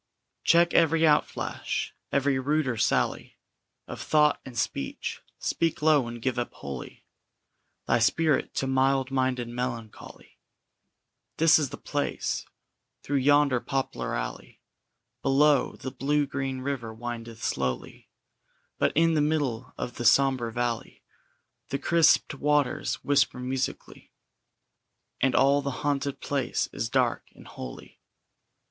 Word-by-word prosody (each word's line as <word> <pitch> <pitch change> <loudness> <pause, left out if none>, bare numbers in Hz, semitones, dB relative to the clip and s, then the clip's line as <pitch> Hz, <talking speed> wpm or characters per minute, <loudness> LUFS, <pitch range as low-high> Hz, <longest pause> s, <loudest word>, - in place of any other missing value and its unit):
] - - -54
Check 170 +1 +4
every 165 -1 +4
outflash, 155 -2 0 0.2
every 140 -1 +2
ruder 140 -1 0
sally - - 0 0.5
Of - - -8
thought 150 -1 +3
and 125 -3 -10
speech; 70 -11 -3 0.2
speak 165 -1 -1
low, 150 -5 +4
and 120 0 -7
give 125 +1 -1
up 120 - -3
wholly 70 -3 -8 0.8
Thy - - +2
spirit 150 +5 +1
to - - 0
mild 135 0 +1
minded 130 -2 0
Melancholy; 120 -2 -7 1.0
This 160 0 +6
is 145 -4 -1
the - - -8
place. - - -3 0.6
Through 145 - 0
yonder 140 -1 +4
poplar 135 +1 -3
alley - - -6 0.6
Below, 140 0 +3
the 130 - -6
blue 145 +3 0
green 135 -1 -3
river 130 -4 -3
windeth 115 0 -7
slowly; 65 -2 -3 0.7
But - - +2
in 165 0 +4
the 155 - +2
middle 145 -6 -1
of 120 - -5
the 120 - -4
sombre 130 -3 +4
valley 120 0 -3 0.7
The 140 - -1
crispèd 160 -3 +3
waters 145 -2 +1
whisper 140 -3 +2
musically, 130 +1 -4 1.1
And 130 -1 +2
all 140 +2 +4
the 140 - -3 0.2
haunted 140 -1 -1
place 140 -3 -1
is - - -3
dark - - +1
and - - -15
holy. 60 - -10
135 Hz, 125 wpm, -27 LUFS, 120-145 Hz, 1.1 s, This